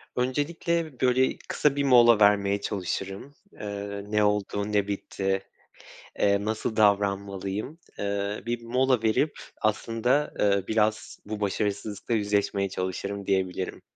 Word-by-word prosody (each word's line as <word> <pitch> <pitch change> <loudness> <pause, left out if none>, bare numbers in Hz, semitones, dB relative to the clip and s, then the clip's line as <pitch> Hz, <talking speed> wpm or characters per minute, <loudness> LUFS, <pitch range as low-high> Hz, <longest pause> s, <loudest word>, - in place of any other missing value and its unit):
Öncelikle, 150 +3 -1
böyle, 130 +1 +3
kısa 145 -2 +2
bir 140 - 0
mola 120 -4 +6
vermeye 100 -1 +4
çalışırım. 100 +7 -4 0.2
Eee, 100 -1 -5
ne 105 0 +2
oldu, 105 0 0
ne 100 -1 +2
bitti? 95 -1 -2 0.8
Eee, 100 0 +2
nasıl 110 +1 -2
davranmalıyım? 100 - 0 0.2
Eee, 100 0 -2
bir 120 0 -2
mola 125 0 +1
verip 115 +7 +1 0.2
aslında, 115 +6 +1
ııı, 100 -2 +2
biraz 110 0 0
bu 105 0 -5
başarısızlıkla 100 +2 -2
yüzleşmeye 100 -2 +1
çalışırım 95 +2 -4
diyebilirim. 95 -1 -1
105 Hz, 115 wpm, -27 LUFS, 100-120 Hz, 0.8 s, mola